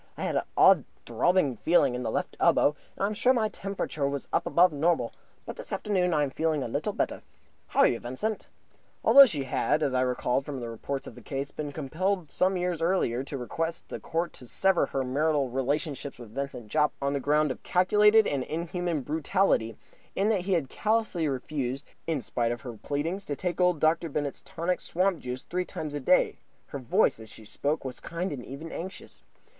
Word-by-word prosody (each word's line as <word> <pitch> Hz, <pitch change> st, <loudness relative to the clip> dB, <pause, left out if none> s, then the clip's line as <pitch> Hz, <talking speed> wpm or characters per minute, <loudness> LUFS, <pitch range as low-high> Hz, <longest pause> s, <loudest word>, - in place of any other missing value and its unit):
I -, -, -4 dB
had -, -, -1 dB
an -, -, +3 dB, 0.2 s
odd -, -, +7 dB, 0.2 s
throbbing 175 Hz, -9 st, +2 dB
feeling 145 Hz, -4 st, +3 dB
in 125 Hz, -, -3 dB
the 125 Hz, -, -2 dB
left -, -, -2 dB
elbow, 145 Hz, -, +4 dB, 0.2 s
and -, -, -4 dB
I -, -, +4 dB
am 210 Hz, -, -1 dB
sure 245 Hz, +4 st, +3 dB
my 220 Hz, -4 st, +1 dB
temperature 185 Hz, -9 st, -3 dB
was 140 Hz, -1 st, -4 dB
above 180 Hz, +1 st, +4 dB
the 145 Hz, -, -7 dB
normal. 155 Hz, -6 st, +1 dB, 0.3 s
But -, -, -7 dB
this -, -, -8 dB
afternoon 185 Hz, -4 st, 0 dB
I 150 Hz, -2 st, +2 dB
am 140 Hz, -, -2 dB
a 155 Hz, -5 st, 0 dB
little 115 Hz, -, -2 dB
better. -, -, -2 dB, 0.5 s
How -, -, +2 dB
are -, -, +7 dB
you, 115 Hz, -, 0 dB
Vincent?" 160 Hz, -, -3 dB, 0.6 s
Although 275 Hz, -1 st, +9 dB
she 150 Hz, -, -2 dB
had, 150 Hz, +3 st, 0 dB
as 135 Hz, -, 0 dB
I 130 Hz, -, +2 dB
recalled 125 Hz, +1 st, 0 dB
from 140 Hz, -1 st, -5 dB
the 120 Hz, -1 st, -5 dB
reports 135 Hz, +4 st, -4 dB
of -, -, -9 dB
the -, -, -13 dB
case, 140 Hz, 0 st, -4 dB
been 150 Hz, -1 st, -5 dB
compelled 160 Hz, +4 st, -2 dB
some 185 Hz, +1 st, +2 dB
years 175 Hz, -2 st, -1 dB
earlier 165 Hz, -8 st, +1 dB
to 140 Hz, 0 st, -5 dB
request 165 Hz, +6 st, -3 dB
the -, -, -5 dB
Court 170 Hz, +1 st, -2 dB
to 125 Hz, -, -10 dB
sever 190 Hz, +9 st, +2 dB
her 135 Hz, -, -2 dB
marital 140 Hz, +1 st, +1 dB
relations 140 Hz, +3 st, -1 dB
with 115 Hz, -3 st, -12 dB
Vincent 135 Hz, -4 st, -5 dB
Jopp 150 Hz, +4 st, +2 dB
on 140 Hz, 0 st, 0 dB
the 140 Hz, -, 0 dB
ground 150 Hz, +1 st, +2 dB
of -, -, -7 dB
calculated 210 Hz, +4 st, +4 dB
and 140 Hz, -7 st, 0 dB
inhuman 170 Hz, 0 st, -2 dB
brutality, 150 Hz, -, +1 dB, 0.4 s
in 200 Hz, +3 st, +2 dB
that 210 Hz, -4 st, +2 dB
he 195 Hz, -, +2 dB
had 165 Hz, -6 st, +1 dB
callously 215 Hz, -, 0 dB
refused, 135 Hz, 0 st, -3 dB, 0.2 s
in 160 Hz, -5 st, 0 dB
spite 120 Hz, -1 st, -1 dB
of 120 Hz, -, -4 dB
her 125 Hz, -3 st, -7 dB
pleadings, 150 Hz, -, -3 dB
to 145 Hz, -, -3 dB
take 180 Hz, +5 st, -2 dB
old 180 Hz, -3 st, +3 dB
Dr. 160 Hz, +2 st, +2 dB
Bennett's 145 Hz, -1 st, -3 dB
Tonic 175 Hz, +2 st, -2 dB
Swamp 185 Hz, -1 st, 0 dB
Juice 125 Hz, -1 st, -5 dB
three 180 Hz, +1 st, -2 dB
times 155 Hz, -4 st, -6 dB
a 145 Hz, -, -2 dB
day, 180 Hz, +7 st, +3 dB, 0.3 s
her 140 Hz, -, -6 dB
voice, 120 Hz, -2 st, +2 dB
as 110 Hz, -1 st, -11 dB
she 110 Hz, -, -12 dB
spoke, 145 Hz, +7 st, -2 dB
was 130 Hz, -1 st, -5 dB
kind 170 Hz, +2 st, -4 dB
and 125 Hz, -4 st, -6 dB
even 150 Hz, +6 st, -8 dB
anxious. 190 Hz, +3 st, -8 dB
150 Hz, 205 wpm, -28 LUFS, 135-180 Hz, 0.6 s, Although